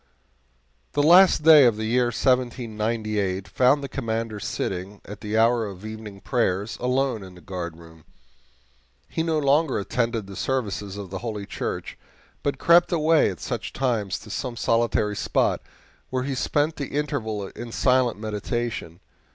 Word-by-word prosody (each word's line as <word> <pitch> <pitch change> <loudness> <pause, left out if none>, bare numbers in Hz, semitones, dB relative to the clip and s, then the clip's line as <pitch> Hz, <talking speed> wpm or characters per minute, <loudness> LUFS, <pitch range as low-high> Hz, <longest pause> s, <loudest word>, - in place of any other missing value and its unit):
The 145 - +2
last 175 0 +7
day 155 -2 +9
of 115 -3 +3
the 110 - -3
year 120 +2 +2
1798 110 -6 -1
found 130 +8 +3
the - - -3
Commander 115 -3 -3
sitting, 95 +1 -4
at 105 - -9
the 105 0 -2
hour 115 0 +3
of 100 0 -9
evening 110 -2 -8
prayers, 105 -4 0
alone 125 -2 0
in 95 -1 -11
the 90 - -14
guardroom. 85 -2 -8 1.0
He - - -2
no 160 -1 0
longer 145 0 +2
attended 115 +1 -1
the 100 0 -10
services 105 -6 -2
of 100 -3 -7
the 95 - -4
Holy 105 -4 -5
Church, - - -5 0.4
but 140 -1 -1
crept 170 +5 +5
away 160 -1 +3
at 95 - -7
such - - -4
times 115 -7 -1
to 105 - -11
some 125 +2 -3
solitary 115 -3 +1
spot, - - +1 0.5
where 130 -1 -1
he 135 +1 -2
spent 145 +4 0
the 140 - -3
interval 110 -9 -2
in 120 0 -8
silent 125 -2 +2
meditation. 105 -4 -4
115 Hz, 150 wpm, -24 LUFS, 100-130 Hz, 1.0 s, day